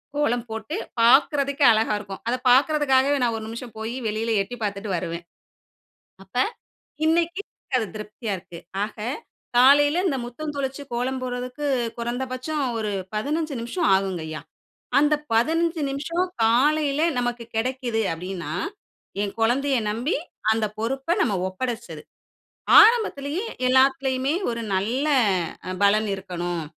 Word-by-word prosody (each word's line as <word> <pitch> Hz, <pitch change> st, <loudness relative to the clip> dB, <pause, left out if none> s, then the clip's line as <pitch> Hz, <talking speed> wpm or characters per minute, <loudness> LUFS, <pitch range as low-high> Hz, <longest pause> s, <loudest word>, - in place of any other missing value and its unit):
கோலம் 245 Hz, -5 st, 0 dB
போட்டு, 220 Hz, +8 st, -5 dB, 0.3 s
பார்க்கறதுக்கே 280 Hz, +3 st, +4 dB
அழகா 220 Hz, -1 st, +2 dB
இருக்கும், 195 Hz, -2 st, -8 dB
அதை 250 Hz, -, +1 dB
பார்க்கிறதுக்காகவே 280 Hz, 0 st, +4 dB
நான் 230 Hz, -2 st, +1 dB
1 220 Hz, -, -6 dB
நிமிஷம் 230 Hz, 0 st, -8 dB
போய் 225 Hz, +3 st, -4 dB
வெளியில 220 Hz, +2 st, -1 dB
எட்டி 245 Hz, +5 st, -8 dB
பார்த்துட்டு 200 Hz, 0 st, -3 dB
வருவேன். 170 Hz, 0 st, -5 dB, 1.0 s
அப்ப, 195 Hz, -, -27 dB, 0.7 s
இன்னைக்கு 340 Hz, +3 st, +1 dB, 0.4 s
அது 220 Hz, -, -1 dB
திருப்தியா 210 Hz, 0 st, -5 dB
இருக்கு. 170 Hz, -1 st, -11 dB, 0.2 s
ஆக, 220 Hz, -, -6 dB, 0.6 s
காலையில 290 Hz, +6 st, +6 dB
இந்த 275 Hz, -5 st, 0 dB
முற்றம் 295 Hz, +5 st, -6 dB
தொளிச்சு 270 Hz, +1 st, -3 dB
கோலம் 255 Hz, +2 st, -1 dB
போடுறதுக்கு, 250 Hz, +3 st, -4 dB, 0.3 s
குறைந்தபட்சம் 255 Hz, +5 st, -3 dB, 0.2 s
ஒரு 210 Hz, -1 st, -2 dB, 0.2 s
15 300 Hz, +6 st, -1 dB
நிமிஷம் 315 Hz, +8 st, -1 dB
ஆகுங்கய்யா, 170 Hz, -5 st, -3 dB, 0.6 s
அந்த 295 Hz, +1 st, +3 dB, 0.2 s
15 325 Hz, +7 st, +2 dB
நிமிஷம், 335 Hz, +6 st, -1 dB, 0.2 s
காலையல 285 Hz, +5 st, +3 dB, 0.2 s
நமக்கு 245 Hz, -1 st, -2 dB
கிடைக்கிது 240 Hz, -1 st, -1 dB
அப்பிடினா, 175 Hz, -2 st, -5 dB, 0.7 s
என் 200 Hz, -, -3 dB
குழந்தைய 265 Hz, +4 st, +2 dB
நம்பி, 235 Hz, +9 st, -1 dB, 0.4 s
அந்த 220 Hz, -1 st, +1 dB
பொறுப்பை 270 Hz, +8 st, -1 dB
நம்ம 215 Hz, -, +2 dB, 0.2 s
ஒப்படைச்சது. 235 Hz, +3 st, -5 dB, 0.8 s
ஆரம்பத்திலேயே 390 Hz, -6 st, +2 dB, 0.2 s
எல்லாத்திலயுமே, 265 Hz, +1 st, +3 dB, 0.2 s
"ஒரு 230 Hz, 0 st, -3 dB
நல்ல 235 Hz, +10 st, 0 dB, 0.8 s
பலன் 210 Hz, +1 st, +4 dB
இருக்கணும், 175 Hz, -3 st, -4 dB
250 Hz, 115 wpm, -24 LUFS, 220-285 Hz, 1.0 s, காலையில